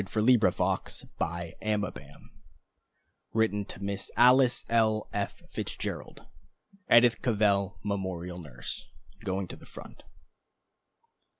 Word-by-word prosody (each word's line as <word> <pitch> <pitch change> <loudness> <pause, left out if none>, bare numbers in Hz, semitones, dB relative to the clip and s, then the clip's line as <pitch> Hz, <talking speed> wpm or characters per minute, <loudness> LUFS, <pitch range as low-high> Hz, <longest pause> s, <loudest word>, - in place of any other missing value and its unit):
The 110 +5 +3
Merciful 85 0 -1
Hand 105 -1 -1 1.4
Written 110 -2 +1
to 100 - -7
Miss 100 0 -3
Alice 125 +1 +5
L. 110 -2 +2
F. 100 -1 -3
Fitzgerald, - - -5 0.7
Edith 120 0 +6
Cavell 100 -4 +2
memorial 95 -3 -3
nurse, 60 -7 -7 0.4
going 95 0 -2
to - - -6
the - - -16
front. - - -12
100 Hz, 95 wpm, -29 LUFS, 95-110 Hz, 1.4 s, Edith